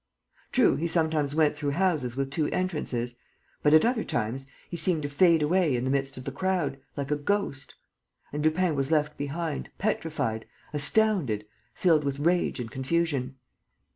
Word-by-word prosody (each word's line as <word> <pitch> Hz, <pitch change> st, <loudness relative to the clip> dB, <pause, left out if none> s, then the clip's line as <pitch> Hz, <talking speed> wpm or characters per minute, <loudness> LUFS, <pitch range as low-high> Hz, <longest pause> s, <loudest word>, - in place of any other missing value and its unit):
True, 255 Hz, -3 st, +4 dB
he 170 Hz, -, -1 dB
sometimes 160 Hz, -3 st, +1 dB
went 155 Hz, -2 st, +3 dB
through 145 Hz, -1 st, -2 dB
houses 155 Hz, -10 st, +1 dB
with 135 Hz, 0 st, -2 dB
two 150 Hz, +1 st, 0 dB
entrances. 150 Hz, -10 st, -2 dB, 0.5 s
But, 150 Hz, +1 st, +5 dB
at 155 Hz, -, +6 dB
other 235 Hz, -1 st, +1 dB
times, 120 Hz, +4 st, -2 dB, 0.2 s
he -, -, -6 dB
seemed 170 Hz, -3 st, +1 dB
to 145 Hz, -, -2 dB
fade 165 Hz, +2 st, +4 dB
away 165 Hz, -2 st, +2 dB
in 120 Hz, -, -1 dB
the 130 Hz, -, 0 dB
midst 135 Hz, -1 st, -1 dB
of 130 Hz, -, -7 dB
the 135 Hz, -, -4 dB
crowd, 175 Hz, -3 st, -1 dB, 0.2 s
like 140 Hz, 0 st, -3 dB
a -, -, +3 dB
ghost. 145 Hz, -3 st, -2 dB, 0.6 s
And 150 Hz, 0 st, -2 dB
Lupin 160 Hz, +2 st, +2 dB
was 135 Hz, -1 st, -1 dB
left 150 Hz, -2 st, +2 dB
behind, 150 Hz, +2 st, -3 dB
petrified, 155 Hz, -, -2 dB, 0.3 s
astounded, 150 Hz, -, +1 dB, 0.3 s
filled 160 Hz, -5 st, +3 dB
with 140 Hz, -1 st, -2 dB
rage 170 Hz, 0 st, +1 dB
and 115 Hz, -2 st, -5 dB
confusion. 135 Hz, -2 st, -1 dB
150 Hz, 170 wpm, -27 LUFS, 135-170 Hz, 0.6 s, at